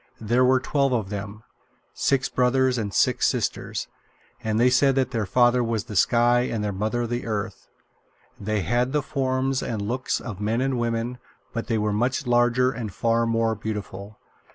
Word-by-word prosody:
There 120 Hz, +3 st, +2 dB
were 130 Hz, +1 st, +4 dB
twelve 140 Hz, 0 st, 0 dB
of 110 Hz, -5 st, -1 dB
them 100 Hz, +1 st, -6 dB, 0.5 s
six 135 Hz, -1 st, +1 dB
brothers 125 Hz, 0 st, +2 dB
and 105 Hz, -3 st, -3 dB
six -, -, +2 dB
sisters -, -, -2 dB, 0.6 s
and 110 Hz, 0 st, 0 dB
they 125 Hz, +2 st, +4 dB
said 135 Hz, +1 st, +4 dB
that 130 Hz, -1 st, +1 dB
their 110 Hz, -4 st, -2 dB
father 120 Hz, +3 st, +3 dB
was 115 Hz, -3 st, -1 dB
the 105 Hz, -, -9 dB
Sky 120 Hz, +4 st, +4 dB
and 110 Hz, -2 st, -2 dB
their 105 Hz, -1 st, -2 dB
mother 110 Hz, +5 st, -1 dB
the 120 Hz, 0 st, -3 dB
Earth. 105 Hz, -1 st, -4 dB, 0.7 s
They 105 Hz, 0 st, -1 dB
had 120 Hz, -, 0 dB
the 150 Hz, -2 st, +1 dB
form 135 Hz, -2 st, -1 dB
and 115 Hz, -3 st, -3 dB
looks 120 Hz, +6 st, -2 dB
of 105 Hz, -4 st, -7 dB
men 110 Hz, +3 st, 0 dB
and 130 Hz, -1 st, 0 dB
women, 120 Hz, +1 st, -2 dB, 0.3 s
but 115 Hz, -, -4 dB
they 115 Hz, -, 0 dB
were 105 Hz, -1 st, 0 dB
much 125 Hz, +6 st, 0 dB
larger 120 Hz, +1 st, +3 dB
and 115 Hz, -4 st, -5 dB
far 115 Hz, +3 st, +1 dB
more 115 Hz, 0 st, +1 dB
beautiful. 105 Hz, -1 st, -6 dB
120 Hz, 175 wpm, -24 LUFS, 110-125 Hz, 0.7 s, were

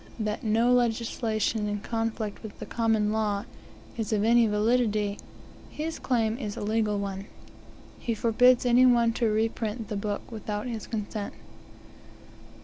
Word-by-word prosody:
that 215 Hz, -1 st, -2 dB
no 230 Hz, +3 st, +3 dB
legislation, 225 Hz, -2 st, 0 dB
in 205 Hz, 0 st, -2 dB
conflict 225 Hz, -1 st, -3 dB
with 220 Hz, -2 st, -9 dB
the -, -, -7 dB
Common 220 Hz, -2 st, +1 dB
Law, 210 Hz, -2 st, 0 dB, 0.5 s
is 225 Hz, -1 st, -2 dB
of 210 Hz, -1 st, +2 dB
any 230 Hz, +1 st, +5 dB
validity, 210 Hz, -1 st, +1 dB, 0.5 s
his 320 Hz, +2 st, -4 dB
claim 230 Hz, -2 st, 0 dB
is 210 Hz, -6 st, -4 dB
a -, -, -4 dB
legal 215 Hz, 0 st, 0 dB
one. 200 Hz, 0 st, -4 dB, 0.7 s
He 230 Hz, -, -2 dB
forbids 245 Hz, +3 st, +4 dB
any 250 Hz, +1 st, +6 dB
one 235 Hz, -2 st, +4 dB
to 230 Hz, -1 st, +1 dB
reprint 220 Hz, 0 st, -1 dB
the 210 Hz, -, -3 dB
book 205 Hz, +2 st, -4 dB
without 210 Hz, -1 st, -4 dB
his 230 Hz, -4 st, -5 dB
consent. 210 Hz, -1 st, -4 dB
220 Hz, 140 wpm, -27 LUFS, 210-235 Hz, 0.7 s, any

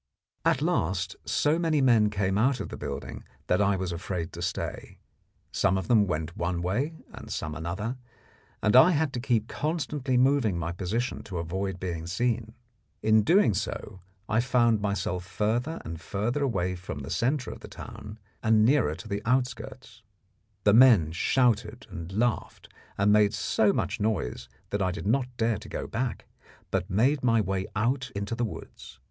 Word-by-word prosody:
At -, -, +2 dB
last 90 Hz, +2 st, 0 dB
so 145 Hz, +8 st, +2 dB
many 160 Hz, -3 st, +2 dB
men 115 Hz, -6 st, +4 dB
came 95 Hz, -2 st, 0 dB
out 125 Hz, +5 st, +2 dB
of -, -, -5 dB
the -, -, -6 dB
building -, -, -6 dB, 0.2 s
that 90 Hz, -, +2 dB
I 100 Hz, -1 st, +3 dB
was 95 Hz, -1 st, -3 dB
afraid 85 Hz, 0 st, -4 dB
to -, -, -7 dB
stay. -, -, -4 dB, 0.5 s
Some 95 Hz, -, +2 dB
of 95 Hz, -, -4 dB
them 110 Hz, -4 st, +4 dB
went 80 Hz, -1 st, -3 dB
one 85 Hz, 0 st, -2 dB
way, 125 Hz, -, -1 dB, 0.2 s
and -, -, -9 dB
some 75 Hz, -, -3 dB
another, 95 Hz, -, -4 dB, 0.7 s
and 105 Hz, -, +3 dB
I 155 Hz, +8 st, +8 dB
had 150 Hz, -2 st, 0 dB
to 125 Hz, -, -2 dB
keep 120 Hz, -3 st, 0 dB
constantly 145 Hz, -4 st, -1 dB
moving 125 Hz, -7 st, +3 dB
my 85 Hz, 0 st, -2 dB
position 100 Hz, +8 st, -2 dB
to 95 Hz, -4 st, -5 dB
avoid 95 Hz, +3 st, -3 dB
being 85 Hz, -3 st, -4 dB
seen. 115 Hz, +4 st, -1 dB, 0.5 s
In 110 Hz, 0 st, +5 dB
doing 170 Hz, -, +4 dB
so 100 Hz, 0 st, -4 dB, 0.3 s
I 110 Hz, -, +2 dB
found 120 Hz, -3 st, +3 dB
myself 100 Hz, -3 st, -1 dB
further 115 Hz, -, -1 dB
and 80 Hz, 0 st, -6 dB
further 110 Hz, -, -2 dB
away 95 Hz, -9 st, 0 dB
from 90 Hz, 0 st, -7 dB
the -, -, -7 dB
centre 130 Hz, +2 st, 0 dB
of -, -, -9 dB
the -, -, -10 dB
town, 105 Hz, +1 st, -9 dB, 0.2 s
and 110 Hz, -1 st, +4 dB
nearer 120 Hz, -, +3 dB
to 100 Hz, -, -10 dB
the 100 Hz, -1 st, -3 dB
outskirts. 120 Hz, -1 st, -2 dB, 0.6 s
The 105 Hz, -, +5 dB
men 110 Hz, -10 st, +7 dB
shouted 115 Hz, +4 st, +1 dB
and 85 Hz, +2 st, -7 dB
laughed, 115 Hz, +4 st, -1 dB, 0.3 s
and 100 Hz, +1 st, +4 dB
made 105 Hz, 0 st, +4 dB
so 105 Hz, +1 st, +2 dB
much 100 Hz, -4 st, -2 dB
noise 90 Hz, -, -2 dB, 0.2 s
that 100 Hz, -, -1 dB
I 95 Hz, -, +2 dB
did 90 Hz, -, -6 dB
not 125 Hz, +4 st, +2 dB
dare 115 Hz, -3 st, +1 dB
to -, -, -11 dB
go -, -, -4 dB
back, 120 Hz, +2 st, -3 dB, 0.5 s
but 90 Hz, -, -1 dB
made 125 Hz, +9 st, +2 dB
my 115 Hz, -2 st, +4 dB
way 95 Hz, -2 st, -1 dB
out 125 Hz, +5 st, 0 dB
into 100 Hz, +2 st, -3 dB
the 120 Hz, +1 st, -1 dB
woods. 105 Hz, -, -9 dB
110 Hz, 175 wpm, -27 LUFS, 95-125 Hz, 0.7 s, I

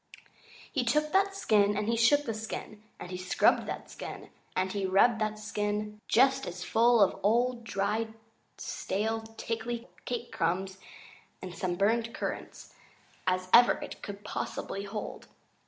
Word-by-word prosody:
He 265 Hz, -, 0 dB
took 300 Hz, +6 st, +1 dB
that 390 Hz, +2 st, +3 dB
skin, 210 Hz, -, +3 dB
and 210 Hz, 0 st, -1 dB
he 230 Hz, -, +2 dB
shook 285 Hz, +6 st, +4 dB
that 225 Hz, -, -2 dB
skin, 215 Hz, -1 st, -6 dB, 0.2 s
and 180 Hz, -, -8 dB
he 180 Hz, -, -3 dB
scrubbed 185 Hz, 0 st, +2 dB
that -, -, -5 dB
skin, -, -, -8 dB, 0.2 s
and 185 Hz, 0 st, 0 dB
he 200 Hz, -2 st, -1 dB
rubbed 220 Hz, +4 st, +4 dB
that 215 Hz, 0 st, 0 dB
skin 210 Hz, 0 st, -3 dB
just 270 Hz, +2 st, +4 dB
as 180 Hz, 0 st, -5 dB
full 235 Hz, 0 st, +4 dB
of 195 Hz, -, 0 dB
old, 235 Hz, +4 st, +2 dB
dry, 220 Hz, +1 st, -1 dB, 0.5 s
stale, 220 Hz, +3 st, -2 dB, 0.2 s
tickly 230 Hz, +1 st, -3 dB, 0.2 s
cake 240 Hz, -1 st, -4 dB
crumbs 190 Hz, +3 st, -1 dB, 0.6 s
and 185 Hz, -1 st, -7 dB
some 175 Hz, 0 st, -2 dB
burned 225 Hz, +4 st, +1 dB
currants -, -, -5 dB, 0.5 s
as 185 Hz, 0 st, +1 dB
ever 240 Hz, +1 st, +8 dB
it -, -, -8 dB
could 205 Hz, 0 st, -7 dB
possibly 200 Hz, +1 st, -4 dB
hold. 205 Hz, +1 st, -6 dB
215 Hz, 150 wpm, -30 LUFS, 195-235 Hz, 0.6 s, ever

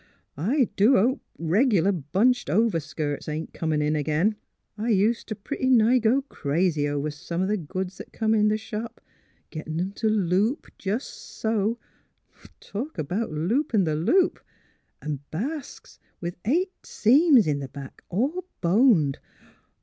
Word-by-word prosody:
I 240 Hz, -, +2 dB
do 220 Hz, +7 st, +5 dB
hope 250 Hz, +8 st, +2 dB, 0.2 s
reg'lar 195 Hz, +3 st, +2 dB
bunched 195 Hz, -, +1 dB
overskirts 155 Hz, -9 st, -1 dB
ain't 155 Hz, +1 st, -4 dB
comin' 155 Hz, -2 st, -1 dB
in 150 Hz, +1 st, +1 dB
ag'in. 155 Hz, +8 st, +1 dB, 0.4 s
I 220 Hz, +3 st, -3 dB
ust 215 Hz, +4 st, +1 dB
t' 215 Hz, -, -4 dB
pretty 260 Hz, +6 st, -3 dB
nigh 245 Hz, 0 st, +5 dB
go 240 Hz, +4 st, +2 dB
crazy 155 Hz, -, 0 dB
over 145 Hz, +1 st, -2 dB
some 170 Hz, +4 st, -4 dB
o' -, -, 0 dB
th' 170 Hz, -7 st, -7 dB
goods 185 Hz, +3 st, -4 dB
that -, -, -9 dB
come 220 Hz, -1 st, 0 dB
in 210 Hz, -1 st, +4 dB
th' 215 Hz, 0 st, 0 dB
shop 220 Hz, +1 st, -6 dB, 0.3 s
— -, -, -39 dB
gettin' 155 Hz, 0 st, -5 dB
'em 185 Hz, +2 st, -1 dB
t' 220 Hz, +2 st, -2 dB
loop 210 Hz, -, +1 dB
jes' 210 Hz, +7 st, -1 dB
so 220 Hz, +1 st, -2 dB, 0.4 s
— -, -, -23 dB
talk 245 Hz, +5 st, -6 dB
about 180 Hz, +8 st, -2 dB
loopin' 210 Hz, -, +1 dB
the 155 Hz, -3 st, 0 dB
loop!... 340 Hz, -, +2 dB, 0.6 s
An' 150 Hz, -2 st, -3 dB
basques 275 Hz, -, -6 dB, 0.2 s
with 175 Hz, 0 st, -4 dB
eight 355 Hz, -, +1 dB
seams 265 Hz, -, +4 dB
in 145 Hz, -2 st, -1 dB
back, 135 Hz, 0 st, -10 dB
all 280 Hz, -, -1 dB
boned! 175 Hz, -, +3 dB
200 Hz, 150 wpm, -25 LUFS, 160-235 Hz, 0.6 s, do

